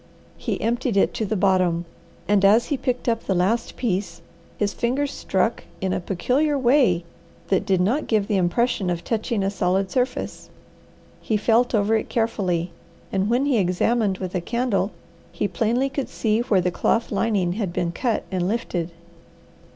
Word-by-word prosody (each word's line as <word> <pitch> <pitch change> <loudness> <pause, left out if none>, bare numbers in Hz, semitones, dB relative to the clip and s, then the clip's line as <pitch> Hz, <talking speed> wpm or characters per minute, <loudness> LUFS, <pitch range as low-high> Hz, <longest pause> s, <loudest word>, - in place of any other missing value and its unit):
He - - -3
emptied 235 -1 0
it - - +3
to 220 - -2
the 215 - -1
bottom, 185 -3 +2 0.4
and 205 -1 +3
as 215 +4 +5
he 290 - +1
picked 255 -2 -2
up 230 -1 +1
the 190 - 0
last 205 +7 0
piece 195 -7 -2 0.3
his 205 -1 0
fingers 270 +4 -1
struck - - -1 0.2
in 190 -1 -1
a - - 0
peculiar 255 - 0
way 245 - +3 0.5
that 190 - +1
did 190 -2 +2
not 235 +12 +1
give 215 -3 +2
the 205 -1 0
impression 190 +3 +1
of 175 -1 -2
touching 220 -2 -1
a 195 - 0
solid 190 -1 0
surface. 250 0 -2 0.7
He 220 - 0
felt 230 +3 +2
over 210 +1 +2
it 220 - -1
carefully, 185 -7 0 0.4
and 195 +1 0
when 245 +4 +2
he 270 -6 +2
examined 195 +2 +1
with 185 -1 -5
a 180 - -1
candle 225 -1 0 0.4
he 205 - -1
plainly 235 +6 0
could 275 0 -4
see 220 -1 0
where 210 -6 +2
the 180 0 0
cloth 230 +6 0
lining 200 -4 +1
had 200 -3 -2
been 170 0 -1
cut 235 +5 -1
and 180 -1 0
lifted. 185 -6 -2
210 Hz, 175 wpm, -23 LUFS, 185-235 Hz, 0.7 s, as